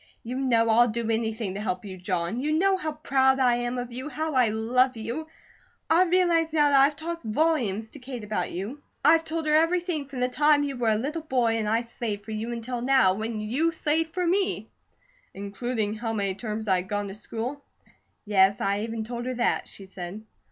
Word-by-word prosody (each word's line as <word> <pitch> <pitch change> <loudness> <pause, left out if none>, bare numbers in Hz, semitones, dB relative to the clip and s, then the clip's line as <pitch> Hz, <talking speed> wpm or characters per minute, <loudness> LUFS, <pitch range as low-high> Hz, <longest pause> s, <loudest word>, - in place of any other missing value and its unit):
"You 250 +3 -4
know 235 -4 +3
I'll 240 +2 +6
do 230 0 -2
anything 220 -3 -1
to 200 - -5
help 185 -2 -3
you, 190 -2 -7
John. 180 +3 -2
You 295 +4 -1
know 385 +5 +3
how 315 -5 -3
proud 265 -3 +2
I 245 -2 +4
am 240 +1 -2
of 245 0 -4
you, 260 +5 -6
how 315 0 -3
I 250 -4 +4
love 240 +3 +1
you! 235 +9 -4 0.6
I 345 +3 +6
realize 345 -2 +2
now 300 -2 +4
that 275 -1 +6
I've 285 +2 +4
talked 335 +2 -5
volumes 225 -4 0
to 290 - -11
Kate 250 -3 -7
about 210 -4 -2
you. 210 +11 -5 0.2
I've 325 +1 +6
told 320 0 -3
her 305 - +2
everything 330 -2 +2
from 270 -2 -7
the 250 - +3
time 295 +3 +3
you 280 -1 -3
were 240 -2 +1
a 215 - +3
little 295 +8 -3
boy 250 -7 +1
and 215 -2 -1
I 225 +2 +2
slaved 220 -3 -5
for 220 - -7
you, 220 +2 -3
until 235 +1 -4
now, 255 -7 +4
when 220 +2 -3
you 260 +11 0
slave 320 0 0
for 360 +2 -2
me." 380 +3 0 0.6
"Including 210 +2 -3
how 225 +1 -3
many 200 -3 0
terms 215 +1 -5
I'd 185 -1 +1
gone 205 0 -1
to - - -7
school?" 235 +7 -5 0.6
"Yes, 200 -1 +4
I 200 +1 0
even 225 +1 -3
told 240 +2 -5
her 255 - -2
that," 240 0 0
she 195 - -9
said. 190 +2 -8
240 Hz, 210 wpm, -26 LUFS, 215-295 Hz, 0.6 s, I'll